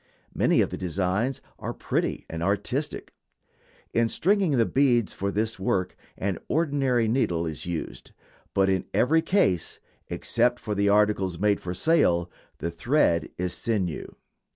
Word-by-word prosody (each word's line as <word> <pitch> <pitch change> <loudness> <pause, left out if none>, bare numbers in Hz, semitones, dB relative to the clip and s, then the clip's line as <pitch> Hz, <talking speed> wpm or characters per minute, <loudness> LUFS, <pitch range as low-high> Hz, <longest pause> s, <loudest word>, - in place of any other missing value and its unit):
Many - - +3
of - - 0
the - - -4
designs 95 - -1 0.2
are - - -5
pretty - - -2
and 80 0 -6
artistic. 105 - -2 0.8
In 115 0 +2
stringing 190 - +2
the 115 - +4
beads 125 -5 +2
for 100 - -2
this 110 +1 -1
work 95 -1 -1 0.2
an 95 -3 -2
ordinary 140 -7 +1
needle 90 -9 +1
is 80 +1 -5
used; 80 -7 -5 0.4
but 95 0 +4
in 95 -1 +1
every 160 +6 +4
case, 100 - +1 0.3
except 120 +1 +1
for 105 - -3 0.2
articles 100 -4 +2
made 105 +2 +2
for 90 0 -5
sale, 90 - +2 0.3
the 85 - -3
thread 85 - +1
is 90 -1 -2
sinew. 95 -8 -2
105 Hz, 140 wpm, -26 LUFS, 90-125 Hz, 0.8 s, the